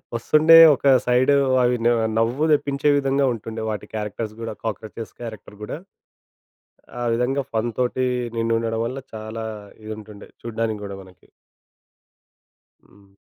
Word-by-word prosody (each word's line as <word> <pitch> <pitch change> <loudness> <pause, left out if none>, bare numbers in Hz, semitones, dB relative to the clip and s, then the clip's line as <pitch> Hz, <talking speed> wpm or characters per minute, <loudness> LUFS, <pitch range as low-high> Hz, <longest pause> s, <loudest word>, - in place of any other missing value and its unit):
వస్తుండే, 155 +7 +5 0.2
ఒక 135 - -11 0.2
సైడు 125 +3 +3 0.3
అవి 125 0 +2
న - - +6 0.3
నవ్వు 120 +7 +1
తెప్పించే 145 0 +1
విధంగా 135 0 +1
ఉంటుండే, 110 0 -7
వాటి 105 -1 -4
క్యారెక్టర్స్ 105 +1 -4
గూడా 115 -1 -4
కాక్రోచెస్ 110 0 -6
క్యారెక్టర్ 110 -2 -9
గూడా. 105 - -5 1.2
ఆ - - -1
విధంగా 125 +4 0
ఫన్ 115 +1 0
తోటి 125 +1 0 0.3
నిండుడడం 115 0 0
వల్ల 130 +3 -4
చాలా 110 +1 -6 0.4
ఇది 110 - -7
ఉంటుండే 105 -1 -12
చూడ్డానికి 115 -2 -3
కూడా 100 -1 -6
మనకి. 95 -2 -20 1.6
హ్మ్. 100 -1 -23
115 Hz, 125 wpm, -22 LUFS, 110-125 Hz, 1.6 s, న